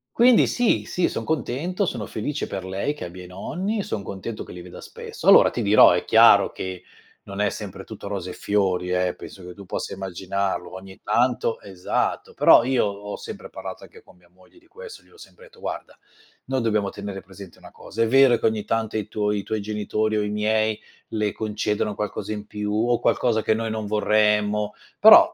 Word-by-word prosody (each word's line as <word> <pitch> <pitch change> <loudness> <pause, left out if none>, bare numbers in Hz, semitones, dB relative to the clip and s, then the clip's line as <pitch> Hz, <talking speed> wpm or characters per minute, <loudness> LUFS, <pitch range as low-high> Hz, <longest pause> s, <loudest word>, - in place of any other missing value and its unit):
Quindi 240 0 +6
sì, 245 -2 +1
sì, 180 - 0
son - - -4
contento, 160 - -1
sono 115 -9 -3
felice 145 +10 -3
per 95 -1 -5
lei 95 +10 -2
che 145 - -7
abbia 90 +1 -9
i - - -11
nonni, 185 - -3
son 105 - -4
contento 100 +4 -6
che - - -12
li 90 - -9
veda 90 0 -11
spesso. - - -8
Allora - - +8
ti 120 - -4
dirò, 105 0 +7
è - - +1
chiaro - - +6
che 95 -1 -6 0.4
non 100 0 -8
è 105 -1 +2
sempre 95 -2 -8
tutto 110 -2 -9
rose 95 -3 -4
e - - -8
fiori, 95 -3 0
eh, 90 0 0
penso 95 -2 -11
che 90 - -8
tu 100 0 -12
possa - - -4
immaginarlo, 95 -1 -3
ogni 95 0 -10
tanto 120 +1 +1
esatto, 95 -3 -2
però - - +6
io 130 -1 +2
ho 100 0 -5
sempre - - -9
parlato 95 0 -8
anche - - -15
con - - -21
mia 90 -1 -26
moglie 90 - -24
di 340 - -27
questo. 470 +4 -11
Gli - - -26
ho - - -22
sempre - - -15
detto: 470 -1 -19
"Guarda, - - -6 0.5
noi 130 -1 -1
dobbiamo 105 -3 0
tenere 100 -1 -7
presente 95 -1 -13
una - - -14
cosa: 115 - -6
è 115 - +3
vero 130 -1 +6
che - - -3
ogni 110 -2 -2
tanto 110 -1 -1
i 105 -1 -3
tuoi 105 -1 -1
i 100 - -6
tuoi 110 -1 -3
genitori 105 +1 -1
o 105 - +1
i 105 - -2
miei 110 +1 +1 0.3
le 105 -2 -1
concedono 105 -1 -2
qualcosa 105 +1 -4
in 105 -1 -6
più 105 0 -4
o 120 +2 +1
qualcosa 115 -3 +1
che - - +2
noi 115 +1 -2
non 110 -1 -3
vorremmo, 105 0 +1 0.2
però - - +8
105 Hz, 210 wpm, -23 LUFS, 95-115 Hz, 0.5 s, Allora